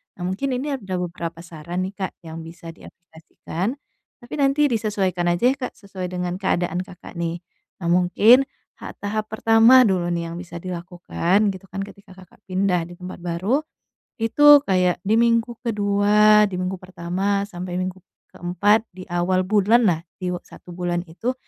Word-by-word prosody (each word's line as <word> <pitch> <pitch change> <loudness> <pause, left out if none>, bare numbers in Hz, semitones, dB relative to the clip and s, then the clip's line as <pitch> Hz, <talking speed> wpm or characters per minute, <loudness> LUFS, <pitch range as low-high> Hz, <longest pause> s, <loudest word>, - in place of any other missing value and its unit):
Nah 175 - -8
mungkin 205 +9 -2
ini 275 +2 -3
ada 190 -4 -5
beberapa 170 -2 -5
saran 175 +2 -5
nih 190 - -4 0.2
Kak - - -17
yang 165 0 -8
bisa 165 0 -10
diaplikasikan. 170 +6 -7 0.5
Tapi 240 - -11
nanti 280 +1 +3
disesuaikan 200 -6 0
aja 175 +3 0
ya - - -2
Kak 250 - -5
sesuai 195 -3 -7
dengan 180 0 -4
keadaan 175 -2 0
Kakak 180 -1 -9
nih. 170 +1 -3 0.4
Nah 170 - -1
mungkin 210 +9 +5 0.3
ha - - -8
tahap 215 +1 -3
pertama 225 +4 +6
dulu 185 -6 +1
nih 170 -1 -2
yang 170 - -6
bisa 175 -1 -10
dilakukan 180 +3 -1
gitu 190 0 -11
kan 195 +1 -5
ketika 200 -1 -13
Kakak 185 -1 -17
pindah 185 -2 +1
di 175 - -11
tempat 180 +1 -9
baru, 180 +9 0 0.6
itu 290 +6 +6
kayak 180 -4 +1
di 215 +3 +2
minggu 235 0 +2
ke-2, 210 -1 +4
di 195 - -6
minggu 185 +1 -3
pertama, 185 +2 -2
sampai 180 -2 -6
minggu 185 +1 -3 0.3
ke-4 205 +6 +1
di 185 - -9
awal 175 +1 +1
bulanlah 205 -2 +3 0.2
di 180 -1 -3
u 180 - -3
1 - - -15
bulan 175 -1 -2
itu 225 +10 -3
185 Hz, 165 wpm, -22 LUFS, 175-210 Hz, 0.6 s, pertama